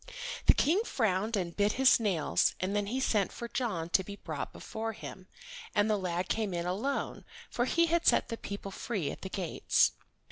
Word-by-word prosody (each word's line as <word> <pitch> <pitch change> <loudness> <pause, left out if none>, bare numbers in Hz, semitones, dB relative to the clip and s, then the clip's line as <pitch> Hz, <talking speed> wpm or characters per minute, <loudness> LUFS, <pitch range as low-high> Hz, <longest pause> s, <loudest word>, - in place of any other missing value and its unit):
The - - +8
King 360 +9 +3
frowned 220 - 0
and 175 -3 -3
bit 205 0 +2
his 265 -1 +5
nails, 195 -9 +1
and 190 +2 -1
then 205 -1 0
he 250 +5 -1
sent 210 -7 +1
for 235 - -6
John 210 -10 -2
to 190 - +3
be 200 +2 -7
brought - - -5
before 225 0 -5
him, 190 -3 -9 0.5
and 205 +1 +4
the - - +4
lad 180 -2 -2
came 210 -5 -1
in 170 0 -2
alone, 215 +11 -2 0.3
for 240 - +1
he 335 +5 +3
had 340 +1 +1
set - - +4
the 230 - -2
people 200 -2 -6
free 190 - -3
at - - -9
the 190 - -5
gates. 185 -3 +2
205 Hz, 200 wpm, -31 LUFS, 185-235 Hz, 0.5 s, The